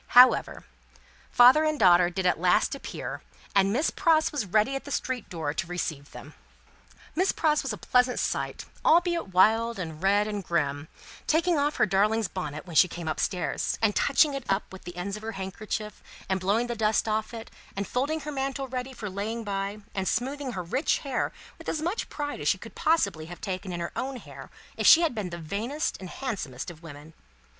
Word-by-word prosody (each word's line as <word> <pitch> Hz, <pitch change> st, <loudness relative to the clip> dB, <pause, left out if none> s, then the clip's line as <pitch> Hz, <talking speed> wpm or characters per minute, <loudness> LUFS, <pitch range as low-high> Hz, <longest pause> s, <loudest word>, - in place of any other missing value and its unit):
However, 250 Hz, +1 st, +6 dB, 0.7 s
father 255 Hz, +6 st, +7 dB
and 310 Hz, -1 st, +1 dB
daughter 175 Hz, -2 st, +6 dB
did 185 Hz, +1 st, -3 dB
at 180 Hz, -, +2 dB
last 180 Hz, 0 st, +3 dB
appear, 275 Hz, -, -6 dB, 0.3 s
and 195 Hz, 0 st, +4 dB
Miss 275 Hz, +9 st, +1 dB
Pross 320 Hz, -4 st, +3 dB
was 285 Hz, -10 st, -2 dB
ready 215 Hz, +8 st, +2 dB
at 270 Hz, -, -4 dB
the -, -, -9 dB
street 260 Hz, -4 st, -3 dB
door 160 Hz, -4 st, -3 dB
to 165 Hz, -, -3 dB
receive 160 Hz, -5 st, -4 dB
them. -, -, -11 dB, 0.8 s
Miss 370 Hz, +4 st, +2 dB
Pross 305 Hz, -2 st, +2 dB
was 270 Hz, -, -3 dB
a 210 Hz, -, -4 dB
pleasant 250 Hz, +3 st, +2 dB
sight, -, -, -2 dB, 0.2 s
albeit 345 Hz, -, +3 dB
wild, 220 Hz, +5 st, +3 dB
and 160 Hz, -4 st, -6 dB
red, 200 Hz, +2 st, +3 dB
and 205 Hz, -2 st, -3 dB
grim, 150 Hz, -3 st, -1 dB, 0.4 s
taking 330 Hz, 0 st, +2 dB
off 290 Hz, +1 st, +1 dB
her -, -, +3 dB
darling's 210 Hz, +2 st, +2 dB
bonnet 155 Hz, -5 st, -5 dB
when 170 Hz, -3 st, -9 dB
she 180 Hz, -, +7 dB
came 170 Hz, -1 st, -7 dB
up 155 Hz, -, -2 dB
stairs, 180 Hz, -3 st, -1 dB
and 220 Hz, -3 st, +2 dB
touching 285 Hz, +1 st, +3 dB
it 275 Hz, -1 st, -4 dB
up 195 Hz, +1 st, +2 dB
with 190 Hz, -, -11 dB
the 175 Hz, -, -8 dB
ends 190 Hz, +3 st, -4 dB
of -, -, -10 dB
her 225 Hz, +1 st, -5 dB
handkerchief, 210 Hz, +2 st, -5 dB, 0.3 s
and 190 Hz, 0 st, 0 dB
blowing 205 Hz, +6 st, +1 dB
the 240 Hz, -, -3 dB
dust 220 Hz, 0 st, +1 dB
off 215 Hz, 0 st, -1 dB
it, 230 Hz, -1 st, -8 dB, 0.2 s
and 200 Hz, 0 st, -3 dB
folding 290 Hz, +5 st, -1 dB
her 300 Hz, -, -5 dB
mantle 270 Hz, -1 st, -3 dB
ready 255 Hz, +1 st, -5 dB
for 225 Hz, -4 st, -6 dB
laying 210 Hz, +4 st, -4 dB
by, 200 Hz, 0 st, -3 dB
and 190 Hz, -1 st, -2 dB
smoothing 270 Hz, +1 st, -2 dB
her 185 Hz, -, -4 dB
rich 255 Hz, -, 0 dB
hair 270 Hz, -3 st, -1 dB, 0.3 s
with -, -, -6 dB
as 310 Hz, -, -1 dB
much 350 Hz, +8 st, -2 dB
pride 290 Hz, -1 st, -4 dB
as -, -, -2 dB
she -, -, +3 dB
could -, -, -11 dB
possibly 200 Hz, -, +1 dB
have 175 Hz, +1 st, -9 dB
taken 185 Hz, -1 st, -4 dB
in 175 Hz, -, -4 dB
her 170 Hz, -, -4 dB
own 270 Hz, +1 st, -3 dB
hair 250 Hz, -, -10 dB, 0.3 s
if -, -, +2 dB
she 330 Hz, -, +9 dB
had 330 Hz, -6 st, +1 dB
been 210 Hz, -5 st, -3 dB
the 170 Hz, -, -6 dB
vainest 215 Hz, -, -3 dB
and 185 Hz, -, -8 dB
handsomest 175 Hz, -, -5 dB
of 160 Hz, -2 st, -15 dB
women. 155 Hz, -1 st, -11 dB
215 Hz, 205 wpm, -27 LUFS, 180-270 Hz, 0.8 s, she